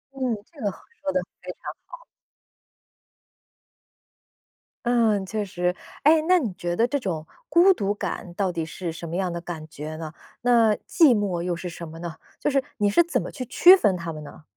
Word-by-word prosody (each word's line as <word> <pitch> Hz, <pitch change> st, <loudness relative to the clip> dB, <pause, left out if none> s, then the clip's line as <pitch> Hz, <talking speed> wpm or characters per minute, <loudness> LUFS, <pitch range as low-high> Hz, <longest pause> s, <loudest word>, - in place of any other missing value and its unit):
嗯， -, -, -9 dB, 0.3 s
这 305 Hz, -, -17 dB
个 205 Hz, -3 st, 0 dB
好， -, -, -14 dB, 0.2 s
说 290 Hz, -, -1 dB
得 280 Hz, -, +1 dB, 0.2 s
非 -, -, -6 dB
常 -, -, -39 dB, 0.3 s
好。 -, -, -12 dB, 2.8 s
嗯， 225 Hz, -5 st, +3 dB
确 210 Hz, +1 st, -2 dB
实。 180 Hz, -1 st, -1 dB, 0.3 s
诶， 310 Hz, +2 st, +6 dB
那 365 Hz, 0 st, +6 dB
你 235 Hz, -, -2 dB
觉 175 Hz, 0 st, -2 dB
得 230 Hz, -, +3 dB
这 285 Hz, +3 st, -1 dB
种 165 Hz, -9 st, -3 dB, 0.2 s
孤 365 Hz, +3 st, +6 dB
独 205 Hz, -, -1 dB
感 180 Hz, -3 st, -5 dB
到 190 Hz, 0 st, 0 dB
底 165 Hz, -2 st, -3 dB
是 170 Hz, 0 st, -5 dB
什 170 Hz, +1 st, -7 dB
么 165 Hz, -, -4 dB
样 185 Hz, -2 st, 0 dB
的 170 Hz, -, -4 dB
感 170 Hz, -2 st, -7 dB
觉 155 Hz, +2 st, -7 dB
呢？ 160 Hz, -1 st, -7 dB, 0.3 s
那 235 Hz, -3 st, +4 dB
寂 305 Hz, -, +4 dB
寞 185 Hz, -4 st, -1 dB
又 175 Hz, 0 st, -1 dB
是 180 Hz, +1 st, -5 dB
什 170 Hz, -1 st, -8 dB
么 165 Hz, +1 st, -10 dB
呢？ 170 Hz, -2 st, -6 dB, 0.2 s
就 295 Hz, -, 0 dB
是 275 Hz, -, +3 dB, 0.2 s
你 205 Hz, -1 st, +2 dB
是 205 Hz, -, +5 dB
怎 340 Hz, -, 0 dB
么 -, -, -6 dB
去 255 Hz, -3 st, -6 dB
区 365 Hz, +10 st, +7 dB
分 200 Hz, -, +2 dB
它 170 Hz, -1 st, -4 dB
们 155 Hz, -1 st, -8 dB
呢？ 150 Hz, -, -12 dB
195 Hz, 215 characters per minute, -25 LUFS, 170-250 Hz, 2.8 s, 区